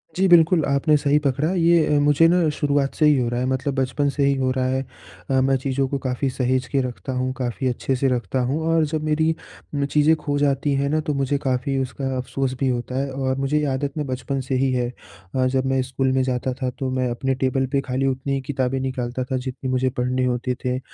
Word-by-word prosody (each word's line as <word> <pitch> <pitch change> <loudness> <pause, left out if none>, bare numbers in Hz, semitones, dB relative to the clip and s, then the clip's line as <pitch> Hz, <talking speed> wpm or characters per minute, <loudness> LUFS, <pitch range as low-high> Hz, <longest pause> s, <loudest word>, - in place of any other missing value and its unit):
जी, 190 +1 +3
बिल्कुल 170 -1 +5
आपने 140 +2 +2
सही 145 0 +2
पकड़ा 145 +4 0
ये 170 -2 +4
अ, - - +4
मुझे 145 +3 +4
ना 175 -1 +3
शुरुआत 140 -1 +1
से 155 - +3
ही 150 -2 +5
हो 120 - 0
रहा 120 0 -2
है 125 - 0
मतलब 130 +2 -1
बचपन 135 +2 0
से 140 0 -1
ही 140 - +3
हो 130 -1 0
रहा 130 0 0
है। 130 0 0 0.5
अ, 130 -1 +3
मैं 135 +1 +3
चीज़ों 135 +1 -1
को 140 - -2
काफ़ी 130 +1 0
सहेज 130 0 0
के 135 -1 +1
रखता 130 +1 -5
हूँ 130 0 -1
काफ़ी 125 +1 -2
अच्छे-से 130 +2 0
रखता 125 +1 -1
हूँ 145 +4 0
और 165 -1 +3
जब 155 0 -3
मेरी 160 +1 +1 0.4
म 140 -1 +1
चीज़ें 150 +2 +5
खो 145 -2 -2
जाती 140 0 +1
हैं 140 +1 0
ना 155 +2 +1
तो 150 - -2
मुझे 140 0 0
काफ़ी 135 -1 -1
उसका 135 +1 -3
अफ़सोस 130 +1 -2
भी 135 - +1
होता 125 +1 -2
है 140 0 -2
और 130 0 -1
मुझे 135 +2 0
ये 150 - 0
आदत 140 +2 -3
ना 150 - 0
बचपन 130 0 -3
से 130 +1 -2
ही 135 +1 +2
है। 125 -1 0 0.5
अ, 130 -1 +2
जब 130 0 0
मैं 135 0 +1
स्कूल 130 +1 -1
में 130 0 +2
जाता 130 0 -1
था 130 - 0
तो 135 - -1
मैं 130 -1 0
अपने 135 +2 -1
टेबल 130 0 0
पे 140 -1 +2
खाली 130 0 -2
उतनी 135 +1 -2
ही 135 - -1
किताबें 130 -1 -1
निकालता 130 -1 -3
था 130 +1 -2
जितनी 130 +1 -5
मुझे 130 0 +1
पढ़ने 125 0 -1
होते 125 0 -1
थे। 125 0 0
135 Hz, 240 wpm, -22 LUFS, 130-145 Hz, 0.5 s, बिल्कुल